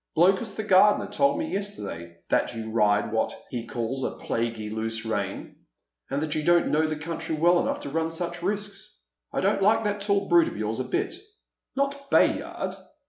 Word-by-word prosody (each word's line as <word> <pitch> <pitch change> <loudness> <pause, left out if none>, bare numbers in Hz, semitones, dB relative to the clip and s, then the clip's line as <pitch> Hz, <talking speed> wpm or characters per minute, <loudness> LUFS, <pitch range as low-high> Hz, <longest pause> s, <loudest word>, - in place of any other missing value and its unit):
" - - -28
Blokus, 195 +5 +3
the 220 - -3
gardener, 205 +1 +5
told 280 +8 +2
me 315 0 -3
yesterday 85 - -5
that - - +1
you 110 -1 -5
ride 105 -2 +3
with 110 - -7
what 110 - -1
he 120 -2 -4
calls 120 +3 -3
a - - 0
' - - -13
plaguey 115 -2 -2
loose 110 +1 -2
rein,' 100 -3 -3 0.5
and 140 +2 -1
that 155 -1 -2
you 155 - 0
don't 175 +2 +3
know 155 +1 +3
the 155 - -2
country 160 +1 -4
well 175 +3 +4
enough - - -1
to - - -5
run 160 +1 0
such 170 +1 -4
risks. 205 +2 -4 0.3
I - - -1
don't 195 +1 +2
like 220 +3 +4
that 205 -1 -1
tall 200 -1 +1
brute 175 -1 +5
of - - -6
yours 110 +2 -2
a 130 - -1
bit." 380 +2 -1 0.3
" - - -60
Not 280 0 -2
Bayard - - +1
170 Hz, 205 wpm, -26 LUFS, -, 0.5 s, gardener